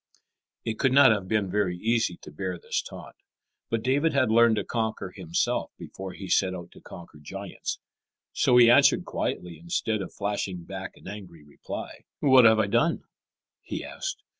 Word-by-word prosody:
It 110 -1 -3
could 130 -1 +2
not 140 -2 +7
have 100 -4 -1
been 105 -2 0
very 95 -3 0
easy 110 -3 0
to - - -10
bear 90 +4 -4
this - - -2
taunt. - - -11 0.5
But 115 -1 -1
David 145 +5 +2
had 130 -5 +2
learned 115 0 +5
to - - -1
conquer 110 -5 -3
himself 85 -3 -1
before 95 -1 -8
he 95 - -8
set 95 0 +2
out 85 -1 -9
to - - -16
conquer 85 -3 -12
giants. 95 +6 -6 0.6
So 125 - +3
he 120 -1 +8
answered 140 +2 +5
quietly 85 -3 -4
instead 100 +6 -2
of - - -6
flashing 100 -3 -3
back 95 +2 -7
an - - -14
angry 95 -6 -9
reply. 75 -1 -8
"What 130 -3 +6
have 110 0 +7
I 110 - +3
done?" 120 +11 +1 0.6
he - - -6
asked. - - -6
105 Hz, 175 wpm, -26 LUFS, 90-115 Hz, 0.6 s, he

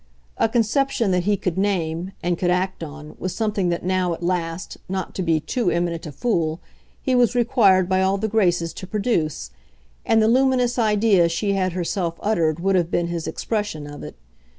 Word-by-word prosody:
A - - +3
conception 235 -1 +1
that 180 -1 +1
he 205 0 +2
could 180 -1 -2
name, 180 -2 -1
and 175 0 +1
could 175 +1 -1
act 180 0 0
on, 150 0 -9
was 185 - -3
something 210 -5 0
that 170 0 -2
now, 185 -2 +1
at 170 - -11
last, 170 0 -2
not 190 -1 -3
to - - -3
be 165 -3 +2
too 235 +6 -1
eminent 170 -1 -1
a - - -6
fool, 160 - -1 0.4
he 260 - +1
was 245 -1 +3
required 215 -7 +4
by 190 0 +2
all 190 +1 +2
the 220 +2 -1
graces 175 -6 +1
to 185 - -8
produce, 170 - -1 0.5
and 225 - +3
the 220 - +4
luminous 250 0 +2
idea 210 -5 +3
she 200 +4 -1
had 185 -2 0
herself 175 -1 -2
uttered 170 -7 +1
would 195 +2 +1
have 175 -2 +1
been 175 -1 0
his 170 -2 -3
expression 205 -9 -3
of 145 0 -9
it. - - -8
185 Hz, 195 wpm, -22 LUFS, 170-215 Hz, 0.5 s, required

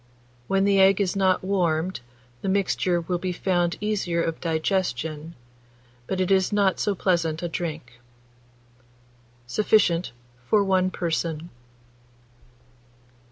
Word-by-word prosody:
When 195 0 +2
the 200 0 +3
egg 195 +1 +5
is 195 -2 0
not 190 -2 +2
warmed, 180 -2 0 0.4
the 195 - -2
mixture 185 -2 +1
will 175 +1 -2
be 185 +1 -2
found 175 -1 0
easier 200 -5 -1
of 165 -1 -3
digestion, 160 -2 -2 0.7
but 190 - -2
it 185 0 0
is 190 0 +3
not 200 -2 +2
so 205 - 0
pleasant 165 -3 0
a - - 0
drink. 155 -8 -5 1.5
Sufficient 180 - +2 0.4
for 210 -2 +4
1 185 -1 +2
person. 165 -2 -3
180 Hz, 115 wpm, -24 LUFS, 165-195 Hz, 1.5 s, egg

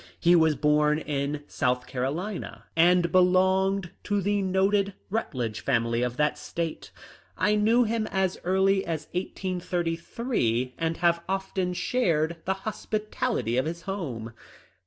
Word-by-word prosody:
He 175 +1 +5
was 160 -2 +4
born 150 +1 +3
in 145 -1 -2
South 125 -3 0
Carolina 155 +11 -4
and 175 +1 +4
belonged 185 0 +3
to 205 0 +1
the 205 +1 +1
noted 195 +1 +1 0.2
Rut 220 -8 -2
ledge 115 -4 -2
family 115 -2 +1
of 125 0 -2
that 150 0 +1
State. 165 -2 -4 0.5
I 210 - +2
knew 220 +4 +4
him 225 -1 -1
as 190 -1 -1
early 190 +1 +2
as 160 -3 -3
1833, 175 - -2
and 165 0 -1
have 170 -1 +2
often 190 -1 -1
shared 170 -9 +1
the 190 - +1
hospitality 215 - -2
of 130 - +2
his 170 +1 -5
home. 130 - -5
175 Hz, 135 wpm, -27 LUFS, 150-195 Hz, 0.5 s, He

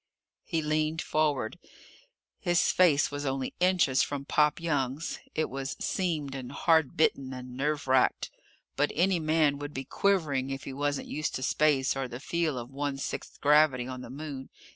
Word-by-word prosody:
He 165 -3 -2
leaned 155 +1 0
forward. 150 -7 0 0.8
His 175 -1 +2
face 160 -7 +4
was 145 0 -4
only 135 -1 -2
inches 180 -8 +3
from 140 -1 -2
Pop 150 +1 +2
Young's. 145 -3 -2 0.2
It 155 - +1
was 135 +1 -4
seamed 155 -7 -1
and 130 -2 -6
hard 160 0 +2
bitten 135 -4 +2
and 125 0 -8
nerve 145 +2 -1
racked. 130 -1 +2 0.4
But 145 +1 +1
any 180 +2 +2
man 155 -2 +2
would 145 0 -7
be 135 - -3
quivering 155 -10 +1
if 135 0 -5
he 135 - -6
wasn't 145 +1 -2
used 155 +1 -3
to 130 - -3
space 140 -2 +2
or 135 -1 -2
the 120 0 -7
feel 160 -1 -1
of 120 +1 -6
one 140 0 -3
sixth 135 - -5
gravity 145 -4 +4
on 130 0 -6
the - - -9
Moon. 140 -1 -7
145 Hz, 170 wpm, -29 LUFS, 135-155 Hz, 0.8 s, face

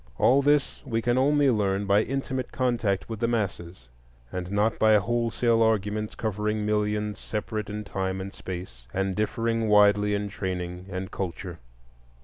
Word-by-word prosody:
All 135 +3 +5
this 145 0 +2
we 115 -5 -1
can 120 +1 +1
only 145 0 +4
learn 100 -2 0
by 100 +1 +4
intimate 130 0 -3
contact 120 -6 0
with 115 -2 -5
the 115 - +1
masses, 95 - -3 0.4
and 90 0 -4
not 105 +2 +1
by 110 0 +6
wholesale 115 +1 +1
arguments 105 -1 +1
covering 105 0 -1
millions 105 -1 0
separate 105 -1 -4
in 105 +1 -4
time 95 -1 -3
and 95 +1 -6
space, 85 -10 -8
and 95 0 0
differing 115 +1 0
widely 105 0 +5
in 100 0 -2
training 90 -1 -4
and 95 0 -5
culture. 90 -2 -5
105 Hz, 150 wpm, -26 LUFS, 95-115 Hz, 0.4 s, by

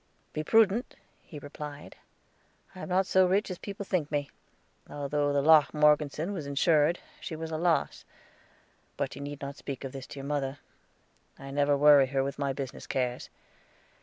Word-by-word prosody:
"Be 155 - -2
prudent," 225 - +3 0.3
he 155 - -11
replied. 145 0 -9 0.8
"I 185 - -12
am - - -7
not 185 +1 +2
so 190 0 +4
rich 195 +2 +1
as 180 - -6
people 200 0 -7
think 175 -6 -1
me. 145 -2 -2 0.6
Although 145 0 -1
the 140 -1 +1
Locke 155 -1 +5
Morgeson 150 +4 +2
was 155 -7 -5
insured, 150 +3 +3 0.2
she 160 - -6
was 160 +1 -6
a 160 - -2
loss. 170 -1 0 0.9
But - - -3
you 140 - -8
need 145 0 -7
not 140 0 -6
speak 140 -2 -7
of 135 - -5
this 135 -1 -8
to - - -10
your 135 - -7
mother. 140 -1 -2 0.8
I 135 0 -9
never 145 0 +2
worry 145 -2 +7
her 135 0 0
with 140 +1 -5
my 140 -1 0
business 135 -1 -6
cares. 125 -2 -2
145 Hz, 175 wpm, -29 LUFS, 140-165 Hz, 0.9 s, worry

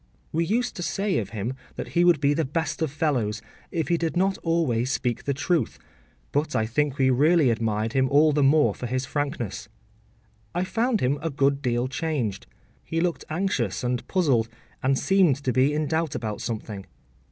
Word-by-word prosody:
We 165 +2 +1
used 240 +7 0
to - - -4
say 195 +2 0
of - - -4
him 110 +3 -3 0.2
that - - -5
he 175 - +2
would 175 -4 +5
be 145 0 +3
the 160 +2 0
best 160 +4 -2
of 160 - +1
fellows, 130 -8 0 0.3
if 165 -3 -2
he 170 - +3
did 165 +1 -2
not 190 +1 +1
always 135 -8 0
speak 125 -3 -2
the 140 - +1
truth, 155 - 0 0.5
but 150 +1 0
I 110 - +2
think 145 +4 0
we 130 -2 +3
really 150 +1 +4
admired 110 -1 -1
him 130 -1 +2
all 150 +3 +5
the 145 0 +1
more 145 +2 +4
for 125 - -5
his 130 +2 -1
frankness. 120 -9 -3 0.9
I 175 - +1
found 225 +3 0
him 140 +3 +1
a 165 - -1
good 140 -1 +1
deal 120 -1 0
changed. 130 -7 -2 0.4
He 165 - -2
looked 175 0 -1
anxious 155 - -1
and 125 0 -2
puzzled, 135 -12 +2 0.3
and 135 +1 +2
seemed 190 -6 +3
to 130 - 0
be 130 +4 +3
in 150 +1 0
doubt 160 -1 -1
about 110 -3 -4
something. 105 -3 -5
140 Hz, 190 wpm, -25 LUFS, 125-165 Hz, 0.9 s, would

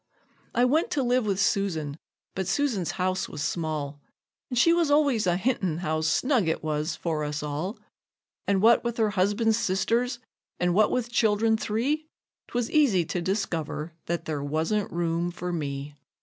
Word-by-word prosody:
I 245 0 +4
went 305 +6 +2
to 275 - +1
live 245 -2 +1
with 195 -2 0
Susan, 165 -8 0 0.4
but 190 -1 -3
Susan's 210 - 0
house 185 0 -1
was 150 - -5
small, 155 -3 -3 0.5
And 250 - -3
she 335 +7 +5
was 340 -3 +2
always 285 -8 +3
a 175 0 +2
hintin' 185 -6 0
how 155 -2 -1
snug 220 - +2
it 160 - -1
was 155 +1 -1
for 160 -3 -2
us 150 0 -3
all; 150 - -3 0.7
And 200 0 +2
what 235 +1 +6
with 235 -1 -2
her 220 -2 +2
husband's 205 +4 +2
sisters, 230 +6 0 0.4
and 180 0 +2
what 215 +3 +4
with 240 -1 -1
child'rn 220 0 +3
three, 260 +9 -1 0.4
'Twas 240 -1 -2
easy 235 - +4
to 175 +2 -3
discover 170 -4 -2
that 170 -1 -2
there 150 -3 -3
wasn't 160 +8 -1
room 170 0 -1
for 180 0 -5
me. 140 -2 -4
190 Hz, 165 wpm, -27 LUFS, 160-235 Hz, 0.7 s, what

